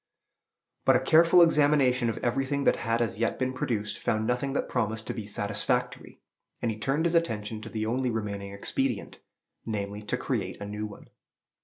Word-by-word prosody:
But 135 - +5
a - - +5
careful 165 +5 +6
examination 145 -6 +3
of 110 - -3
everything 135 +3 0
that - - +3
had 115 0 0
as 105 -2 -4
yet 115 - 0
been 130 0 -1
produced 105 -5 -2
found 110 -2 0
nothing 125 +4 -1
that - - -1
promised 110 -2 -2
to - - -3
be 110 -3 -6
satisfactory; 105 +5 -2 0.4
and 115 - 0
he 110 - -7
turned 135 +8 0
his 170 - +1
attention 110 -10 0
to 110 - -8
the 110 -1 -3
only 125 +3 0
remaining 100 -3 -3
expedient, 110 +3 -2 0.4
namely, 105 -2 -4
to 105 - -2
create - - -3
a 100 - -5
new 105 +1 -4
one. 100 - -12
115 Hz, 180 wpm, -28 LUFS, 105-135 Hz, 0.4 s, careful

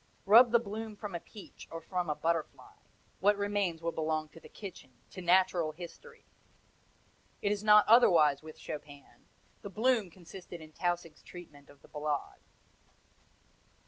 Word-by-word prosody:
Rub 230 +5 +8
the 235 - +6
bloom 220 -1 -6
from 205 -2 -7
a 170 - -3
peach 205 +3 -13
or 165 - -6
from 180 0 -3
a 150 - 0
butterfly 165 0 -3 0.5
what 205 +2 +3
remains 200 -5 -1
will 170 - -1
belong 155 -1 -2
to 160 - -15
the - - -15
kitchen, 180 -10 -10 0.2
to 185 - -8
natural 175 -3 +2
history! 180 - -12 1.2
It 200 - +1
is 210 0 -2
not 210 -1 +6
otherwise 165 - +5
with 155 0 -12
Chopin; 145 -2 -10 0.3
the 200 - -7
bloom 225 0 +1
consisted 175 0 -11
in 155 -1 -13
Tausig's 175 -1 -3
treatment 150 -5 -13
of 145 -1 -19
the - - -16
Ballade. 150 -1 -4
175 Hz, 150 wpm, -31 LUFS, 155-205 Hz, 1.2 s, Rub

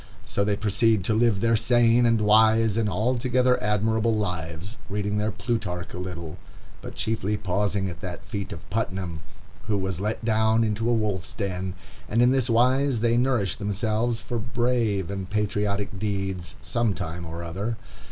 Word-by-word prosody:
So 100 - -1
they 100 0 +1
proceed 105 0 +2
to 110 - +1
live 110 -3 +2
their 115 0 +3
sane, 120 +1 +4
and 115 -1 +3
wise, 110 +1 +5
and 110 -2 +1
altogether 125 +5 +1
admirable 110 +2 +1
lives, 90 +1 -3
reading 105 +1 -1
their 105 +1 0
Plutarch 100 -5 -3
a 90 - -5
little, 85 -2 -6 0.4
but - - -8
chiefly 105 -2 -1
pausing 100 0 0
at 85 - -7
that 90 -3 -6
feat 100 +4 -5
of 85 0 -9
Putnam, 95 -6 -2 0.5
who 105 -2 +1
was 95 -2 -2
let 110 +2 -2
down 110 0 +3
into 110 +1 0
a - - +3
wolf's 105 -5 -1
den; 95 -1 -3 0.3
and 115 +3 +3
in 125 - +5
this 130 -2 +1
wise 125 +1 +3
they 115 0 +3
nourish 120 -6 +1
themselves 110 +3 -1
for 120 - -3
brave 115 -5 0
and 95 -2 -4
patriotic 105 -1 -1
deeds 95 -3 -3
some 115 -4 0
time 85 -2 -5
or 85 +1 -6
other. 100 +7 -3
105 Hz, 165 wpm, -25 LUFS, 95-115 Hz, 0.5 s, wise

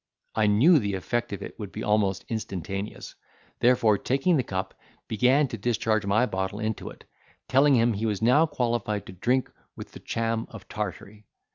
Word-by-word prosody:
I 110 -1 +2
knew 140 - +5
the 100 -4 -2
effect 120 +6 -2
of 100 - -5
it - - -10
would 105 -3 -6
be - - -6
almost 100 -3 +1
instantaneous; 100 -2 -5 0.5
therefore 120 -4 +4
taking 135 +7 +1
the 140 - +3
cup, 95 -5 -4 0.3
began 130 +7 +3
to 115 - -6
discharge 110 -1 0
my 110 +5 +3
bottle 95 -2 -3
into 110 -1 -3
it, - - -14 0.4
telling 135 +1 +4
him 115 -1 +3
he 110 +2 -2
was 105 -3 -1
now 125 +8 +4
qualified 115 - -1
to - - -10
drink 125 +8 0 0.2
with - - -9
the - - -11
Cham 115 0 -2
of 110 -4 -11
Tartary. 105 +1 -6
110 Hz, 175 wpm, -26 LUFS, 100-125 Hz, 0.5 s, knew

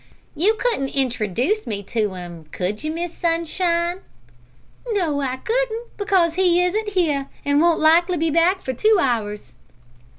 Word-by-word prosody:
"You 390 +9 +2
couldn't 435 - -1
introdooce 255 - -1
me 205 -3 -3
to 210 -1 -2
him, 175 -3 -9
could 185 - -4
you, 310 - -2
Miss 335 +2 -4
Sunshine?" 340 +1 0 0.9
"No, 320 -8 0
I 260 -1 -2
couldn't, 470 - -2
because 380 -5 +2
he 360 0 +3
isn't 415 +4 -1
here, 310 -8 0 0.2
and 285 +1 +3
won't 340 -1 +3
likely 340 +3 +4
be 325 0 0
back 345 +4 +2
for 260 - -3
two 430 - +3
hours." 220 -7 -2
330 Hz, 145 wpm, -21 LUFS, 260-370 Hz, 0.9 s, likely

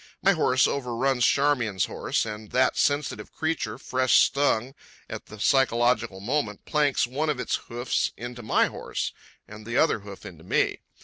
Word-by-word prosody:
My 195 - +6
horse 130 -7 +3
overruns 130 -1 -1
Charmian's 120 -10 +1
horse, - - -2
and 105 -1 -7
that 130 0 +2
sensitive 145 +1 -1
creature, 155 -9 -2
fresh 130 -1 +2
stung 135 -1 +2 0.3
at - - -8
the 105 - -11
psychological 120 -4 +2
moment, 110 -1 -2
planks 145 -3 +2
one 145 +6 -2
of 150 - 0
his 125 - -3
hoofs 120 +2 -1
into 120 0 -7
my 110 - +2
horse - - -4 0.3
and 110 0 -11
the 115 +3 -3
other 160 -7 +3
hoof 100 -1 -11
into 80 -3 -11
me. - - 0
125 Hz, 160 wpm, -26 LUFS, 110-140 Hz, 0.3 s, My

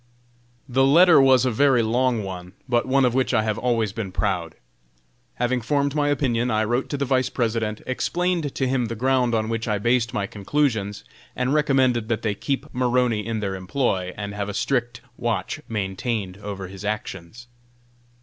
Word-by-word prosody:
The 135 0 +2
letter 160 +3 +7
was 130 -2 +5
a 130 - +2
very 130 0 +3
long 120 0 +1
one, 90 -1 -7
but 120 -1 +1
one 135 0 +3
of 125 - +1
which 130 0 +1
I 110 - +3
have 110 0 -1
always 115 -5 0
been 110 -4 -4
proud. 90 -4 -2 0.8
Having 125 +1 0
formed 140 +3 0
my 145 -1 +1
opinion, 125 -4 +1
I 110 -1 +1
wrote 120 +4 -1
to 145 - -2
the 140 - -1
Vice 130 -1 +1
President, 110 -3 -1
explained 170 +3 -1
to 135 - 0
him 125 -1 +1
the 115 - -4
ground 125 0 +1
on 110 -1 0
which 115 0 -3
I 105 -2 +1
based 120 +2 +1
my 100 - -1
conclusions, 105 -1 -1 0.3
and 125 +2 0
recommended 130 -6 +2
that 115 -1 -1
they 110 -3 0
keep 135 +7 -3
Maroney 125 -3 +1
in 110 -1 -3
their 100 -2 -2
employ, 95 -1 -1
and 100 -1 -5
have 105 0 -3
a 100 - -5
strict 120 0 -1 0.2
watch 115 -2 -2
maintained 100 -1 -3
over 100 -2 -6
his 95 +2 -10
actions. 105 +1 -5
120 Hz, 180 wpm, -23 LUFS, 105-130 Hz, 0.8 s, letter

